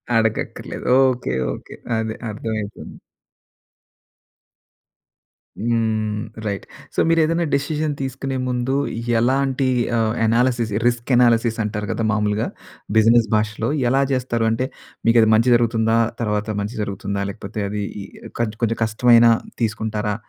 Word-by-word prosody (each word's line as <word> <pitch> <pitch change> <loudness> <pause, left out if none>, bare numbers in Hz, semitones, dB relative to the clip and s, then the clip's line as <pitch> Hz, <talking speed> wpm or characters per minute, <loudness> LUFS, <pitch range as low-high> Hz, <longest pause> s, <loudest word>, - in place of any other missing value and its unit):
అడగక్కర్లేదు. 110 -1 -1 0.2
Okay. 120 - -3 0.2
Okay. - - -10 0.2
అదే 110 0 -3 0.2
అర్థమైపోయింది. 110 -1 -5 2.6
హ్మ్. 110 -1 0 0.3
రైట్. 100 -1 -3 0.3
సో, - - 0
మీరు 165 0 +3
ఏదన్న 165 +2 +1
డెసిషన్ 150 +2 -1
తీసుకునే 135 0 -3
ముందు 125 +2 -1 0.4
ఎలాంటి 135 +2 +1 0.3
ఆహ్, 110 -1 +1
అనాలిసిస్ 120 0 +2 0.2
రిస్క్ 120 +2 -1
అనాలిసిస్ 120 -2 +3
అంటారు 105 0 -3
కదా 115 - -2
మామూలుగా, 105 0 0 0.5
బిజినెస్ 115 +1 +5
భాషలో. 110 +1 -1 0.2
ఎలా 135 +2 +3
చేస్తారు? 125 -3 0
అంటే 125 +3 -1 0.4
మీకు 115 +1 +5
అది 110 - +4
మంచి 115 +3 +3
జరుగుతుందా? 115 -1 +2 0.2
తర్వాత 105 -1 -1
మంచి 105 +4 -4
జరుగుతుందా? 100 0 -3
లేకపోతే 100 +2 -7
అది 105 0 -3 0.8
కొంచెం 115 0 +1
కష్టమైన 115 +1 +5 0.4
తీసుకుంటారా? 110 -1 -1
115 Hz, 110 wpm, -21 LUFS, 110-125 Hz, 2.6 s, బిజినెస్